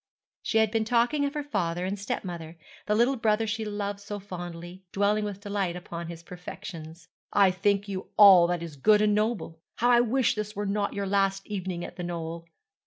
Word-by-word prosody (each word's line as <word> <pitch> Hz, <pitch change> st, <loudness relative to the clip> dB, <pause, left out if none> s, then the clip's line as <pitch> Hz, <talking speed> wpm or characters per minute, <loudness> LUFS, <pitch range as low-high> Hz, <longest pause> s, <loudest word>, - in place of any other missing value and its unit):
She 225 Hz, -, 0 dB
had 220 Hz, -1 st, +3 dB
been 225 Hz, -1 st, +1 dB
talking 240 Hz, +6 st, +2 dB
of 280 Hz, +1 st, -3 dB
her 295 Hz, -, -2 dB
father 180 Hz, -10 st, -2 dB
and 195 Hz, +2 st, -3 dB
stepmother, 170 Hz, -4 st, -5 dB, 0.3 s
the 210 Hz, -, +2 dB
little 245 Hz, +4 st, +3 dB
brother 220 Hz, 0 st, +2 dB
she 220 Hz, +1 st, -2 dB
loved 205 Hz, -1 st, -3 dB
so 205 Hz, +1 st, -6 dB
fondly, 175 Hz, -2 st, -8 dB
dwelling 205 Hz, +2 st, +1 dB
with 200 Hz, -1 st, -6 dB
delight 200 Hz, -4 st, -2 dB
upon 170 Hz, -1 st, -6 dB
his 170 Hz, 0 st, -8 dB
perfections. 165 Hz, -2 st, -9 dB, 0.3 s
'I 195 Hz, -2 st, +5 dB
think 200 Hz, +2 st, +1 dB
you 190 Hz, -1 st, -5 dB
all 190 Hz, -5 st, +9 dB
that 175 Hz, -1 st, -2 dB
is 160 Hz, -4 st, -8 dB
good 210 Hz, +9 st, +4 dB
and 210 Hz, -1 st, +3 dB
noble. 210 Hz, -6 st, -1 dB, 0.2 s
How 245 Hz, +1 st, +2 dB
I 240 Hz, -, +6 dB
wish 245 Hz, +1 st, +2 dB
this 210 Hz, -2 st, -5 dB
were 205 Hz, +1 st, -2 dB
not 200 Hz, 0 st, -1 dB
your 200 Hz, 0 st, -2 dB
last 195 Hz, 0 st, +1 dB
evening 185 Hz, -4 st, -4 dB
at 175 Hz, -, -10 dB
the 180 Hz, -, -4 dB
Knoll!' 170 Hz, -1 st, -5 dB
200 Hz, 200 wpm, -27 LUFS, 175-210 Hz, 0.3 s, all